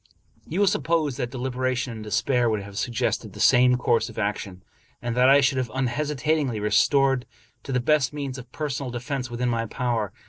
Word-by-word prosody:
You 170 Hz, -, -3 dB
will -, -, +5 dB
suppose 155 Hz, -5 st, +1 dB
that 125 Hz, -3 st, -2 dB
deliberation 130 Hz, -1 st, -2 dB
and 110 Hz, -1 st, -8 dB
despair 120 Hz, +3 st, +1 dB
would 105 Hz, -2 st, -1 dB
have 100 Hz, 0 st, -11 dB
sug 120 Hz, +3 st, -3 dB
gested -, -, -1 dB
the -, -, -11 dB
same 125 Hz, +1 st, +5 dB
course 120 Hz, -2 st, +1 dB
of -, -, -13 dB
action, 100 Hz, -3 st, -3 dB, 0.4 s
and 120 Hz, -1 st, -3 dB
that 125 Hz, +1 st, +5 dB
I 140 Hz, +1 st, +7 dB
should 135 Hz, -1 st, +2 dB
have 125 Hz, -2 st, -2 dB
unhesitatingly 145 Hz, 0 st, 0 dB
resorted 135 Hz, +4 st, +2 dB, 0.3 s
to -, -, -7 dB
the 125 Hz, -, +1 dB
best 135 Hz, +1 st, +2 dB
means 140 Hz, -3 st, -5 dB
of 125 Hz, -1 st, -12 dB
personal 140 Hz, -3 st, -3 dB
de 120 Hz, 0 st, -4 dB
fense 130 Hz, +1 st, -4 dB
within 120 Hz, +1 st, -1 dB
my 115 Hz, -1 st, -1 dB
power. 115 Hz, -4 st, -2 dB
125 Hz, 200 wpm, -25 LUFS, 120-140 Hz, 0.4 s, I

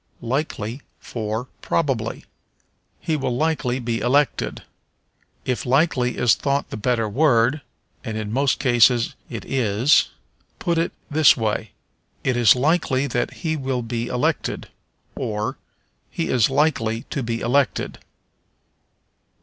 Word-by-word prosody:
Likely 125 Hz, -2 st, -2 dB, 0.2 s
for 110 Hz, +1 st, -4 dB, 0.2 s
Probably. 130 Hz, -8 st, -1 dB, 0.7 s
"He 160 Hz, -, -1 dB
will 130 Hz, -4 st, -1 dB
likely 150 Hz, -5 st, 0 dB
be 120 Hz, -2 st, -2 dB
elected." 140 Hz, +3 st, +1 dB, 0.8 s
If 125 Hz, -2 st, -1 dB
likely 130 Hz, -2 st, +2 dB
is 120 Hz, -3 st, +4 dB
thought 140 Hz, 0 st, -1 dB
the -, -, -4 dB
better 115 Hz, +1 st, 0 dB
word 130 Hz, +2 st, +3 dB, 0.4 s
(and 110 Hz, -4 st, -4 dB
in 110 Hz, -1 st, -4 dB
most 135 Hz, +2 st, +2 dB
cases 120 Hz, -1 st, +4 dB, 0.2 s
it 115 Hz, -5 st, -6 dB
is) 120 Hz, +1 st, +3 dB, 0.5 s
put 170 Hz, -1 st, 0 dB
it 165 Hz, -, 0 dB, 0.2 s
this 155 Hz, 0 st, +6 dB
way: 110 Hz, -4 st, -2 dB, 0.5 s
"It 130 Hz, -, +1 dB
is 120 Hz, -3 st, +6 dB
likely 140 Hz, -1 st, +1 dB
that 125 Hz, -3 st, -1 dB
he 160 Hz, -1 st, +1 dB
will 130 Hz, -4 st, -2 dB
be 115 Hz, 0 st, -3 dB
elected," 125 Hz, 0 st, -1 dB, 0.4 s
or, 105 Hz, 0 st, -3 dB, 0.5 s
"He 80 Hz, -, -3 dB
is 125 Hz, -2 st, +3 dB
likely 130 Hz, -6 st, +1 dB
to 140 Hz, -, -1 dB
be 115 Hz, -1 st, -2 dB
elected." 130 Hz, +3 st, 0 dB
125 Hz, 125 wpm, -22 LUFS, 115-140 Hz, 0.8 s, this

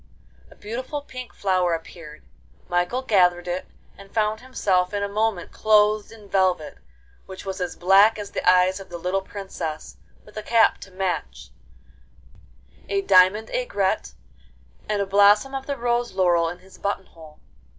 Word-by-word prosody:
A -, -, -17 dB
beautiful 255 Hz, +7 st, -6 dB
pink 255 Hz, -3 st, -9 dB
flower 185 Hz, -3 st, 0 dB
appeared. 165 Hz, -, -11 dB, 0.4 s
Michael 175 Hz, +9 st, -1 dB
gathered 180 Hz, -6 st, +3 dB
it, 180 Hz, +1 st, -3 dB, 0.3 s
and 195 Hz, 0 st, -15 dB
found 215 Hz, -1 st, 0 dB
himself 195 Hz, -7 st, 0 dB
in 200 Hz, -, -1 dB
a -, -, 0 dB
moment 210 Hz, -2 st, -1 dB
clothed 210 Hz, 0 st, +2 dB
in 215 Hz, -2 st, -14 dB
velvet, 185 Hz, -, 0 dB, 0.5 s
which 190 Hz, +1 st, -10 dB
was 190 Hz, -1 st, -5 dB
as 180 Hz, -2 st, -3 dB
black 195 Hz, +5 st, +5 dB
as 205 Hz, -1 st, -7 dB
the -, -, -3 dB
eyes 185 Hz, +1 st, +4 dB
of 195 Hz, -, -11 dB
the 175 Hz, -, -6 dB
little 180 Hz, +3 st, -1 dB
Princess, 190 Hz, -6 st, -7 dB, 0.3 s
with 210 Hz, -, -17 dB
a -, -, -3 dB
cap 225 Hz, +1 st, +3 dB
to -, -, -11 dB
match, 180 Hz, -, -4 dB, 1.4 s
a 200 Hz, 0 st, +1 dB
diamond 190 Hz, +4 st, +4 dB
aigrette, 195 Hz, -, -1 dB, 0.7 s
and 205 Hz, -1 st, +1 dB
a -, -, -4 dB
blossom 205 Hz, +6 st, +4 dB
of 270 Hz, 0 st, -5 dB
the 280 Hz, -1 st, -3 dB
rose 240 Hz, -1 st, -1 dB
laurel 175 Hz, -3 st, +2 dB
in 175 Hz, -, -7 dB
his 185 Hz, +1 st, -18 dB
button 200 Hz, -1 st, -2 dB
hole. 160 Hz, -3 st, -16 dB
195 Hz, 160 wpm, -23 LUFS, 180-215 Hz, 1.4 s, black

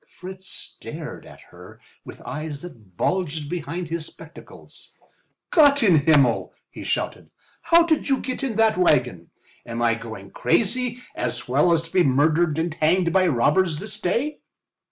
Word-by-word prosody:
Fritz 190 Hz, +1 st, -11 dB
stared -, -, -8 dB
at -, -, -14 dB
her -, -, -14 dB, 0.2 s
with -, -, -11 dB
eyes 155 Hz, -1 st, -6 dB
that 110 Hz, -, -13 dB
bulged 160 Hz, -5 st, -1 dB
behind 170 Hz, 0 st, -4 dB
his 165 Hz, -1 st, -3 dB
spectacles. -, -, -14 dB, 0.6 s
"Gott 285 Hz, -5 st, +5 dB
in 185 Hz, -7 st, +5 dB
Himmel!" 140 Hz, -7 st, +3 dB, 0.2 s
he -, -, -9 dB
shouted. -, -, -3 dB, 0.3 s
"How 335 Hz, 0 st, +5 dB
did 315 Hz, -3 st, 0 dB
you 270 Hz, -, +2 dB
get 255 Hz, +1 st, -5 dB
in 255 Hz, -5 st, -2 dB
that 220 Hz, -2 st, +3 dB
wagon? 180 Hz, -, +2 dB, 0.3 s
Am 115 Hz, -1 st, -6 dB
I 115 Hz, -1 st, +3 dB
going 110 Hz, -4 st, -8 dB
crazy 250 Hz, +3 st, 0 dB
as 120 Hz, 0 st, -3 dB
well 145 Hz, +7 st, +3 dB
as 165 Hz, -1 st, +2 dB
to 165 Hz, -, -13 dB
be 185 Hz, -, +4 dB
murdered 155 Hz, +4 st, +2 dB
and 165 Hz, 0 st, -1 dB
hanged 170 Hz, +2 st, +1 dB
by 185 Hz, -1 st, +4 dB
robbers 150 Hz, +5 st, +2 dB
this 210 Hz, +4 st, -7 dB
day?" 255 Hz, +12 st, -1 dB
170 Hz, 155 wpm, -23 LUFS, 145-200 Hz, 0.6 s, Gott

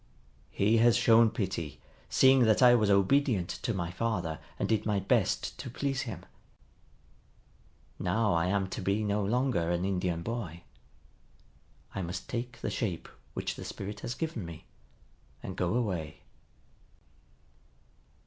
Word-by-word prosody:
He 105 Hz, +3 st, +2 dB
has 120 Hz, +1 st, +5 dB
shown 115 Hz, -1 st, +6 dB
pity, 95 Hz, -, -4 dB, 0.3 s
seeing 130 Hz, -2 st, +5 dB
that 110 Hz, +3 st, +4 dB
I 125 Hz, -1 st, +8 dB
was 110 Hz, -4 st, +3 dB
obedient 100 Hz, 0 st, +3 dB
to -, -, -1 dB
my 85 Hz, -5 st, -3 dB
father 90 Hz, -6 st, -2 dB, 0.2 s
and -, -, -1 dB
did 110 Hz, -2 st, +1 dB
my 105 Hz, -2 st, +1 dB
best -, -, 0 dB
to -, -, -6 dB
please 135 Hz, +2 st, -2 dB
him. -, -, -7 dB, 1.7 s
Now 105 Hz, +3 st, +1 dB
I 85 Hz, +1 st, +2 dB
am 100 Hz, +1 st, +1 dB
to -, -, -5 dB
be 100 Hz, +3 st, 0 dB
no 105 Hz, 0 st, 0 dB
longer 115 Hz, -5 st, +1 dB
an 85 Hz, +1 st, 0 dB
Indian 90 Hz, -3 st, -1 dB
boy. 95 Hz, -7 st, -5 dB, 1.3 s
I 95 Hz, -, -3 dB
must 90 Hz, +1 st, -5 dB
take 125 Hz, +1 st, -5 dB
the -, -, -2 dB
shape 95 Hz, -9 st, -3 dB, 0.3 s
which -, -, -2 dB
the -, -, -8 dB
Spirit 100 Hz, +1 st, -6 dB
has 120 Hz, -, -4 dB
given 160 Hz, -, -3 dB
me, 85 Hz, -1 st, -9 dB, 0.8 s
and 95 Hz, -, -6 dB
go 90 Hz, +4 st, 0 dB
away." 90 Hz, -10 st, -2 dB
100 Hz, 140 wpm, -30 LUFS, 90-115 Hz, 1.7 s, I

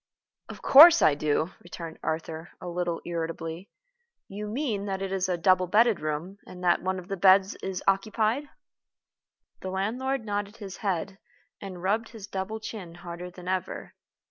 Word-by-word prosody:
"Of -, -, -10 dB
course 330 Hz, +4 st, +9 dB
I 150 Hz, -, +6 dB
do," 150 Hz, +3 st, 0 dB
returned 170 Hz, -2 st, -8 dB
Arthur, 160 Hz, +1 st, -4 dB
a -, -, -8 dB
little 175 Hz, -1 st, -2 dB
irritably. 165 Hz, +1 st, -4 dB, 0.6 s
"You 210 Hz, +2 st, -6 dB
mean 220 Hz, -3 st, -2 dB
that 190 Hz, -1 st, -2 dB
it 195 Hz, -, -3 dB
is 190 Hz, -1 st, 0 dB
a 180 Hz, -, 0 dB
double 185 Hz, +1 st, +3 dB
bedded 220 Hz, +1 st, +4 dB
room, 155 Hz, +6 st, -4 dB
and 180 Hz, 0 st, -10 dB
that 175 Hz, -1 st, +3 dB
one 185 Hz, +1 st, -1 dB
of 180 Hz, -1 st, -8 dB
the 195 Hz, -, -3 dB
beds 190 Hz, +1 st, +5 dB
is 190 Hz, -1 st, -4 dB
occupied?" 215 Hz, +7 st, +1 dB, 1.1 s
The 190 Hz, -, -5 dB
land 195 Hz, +6 st, -2 dB
lord 265 Hz, -2 st, -1 dB
nodded 205 Hz, +1 st, -3 dB
his 200 Hz, -4 st, -8 dB
head, 195 Hz, -1 st, -2 dB, 0.4 s
and 185 Hz, -3 st, -8 dB
rubbed 215 Hz, +4 st, 0 dB
his 220 Hz, -5 st, -9 dB
double 195 Hz, +2 st, -4 dB
chin 195 Hz, -6 st, -8 dB
harder 175 Hz, 0 st, -8 dB
than 180 Hz, 0 st, -12 dB
ever. 185 Hz, 0 st, -3 dB
190 Hz, 170 wpm, -27 LUFS, 175-210 Hz, 1.1 s, course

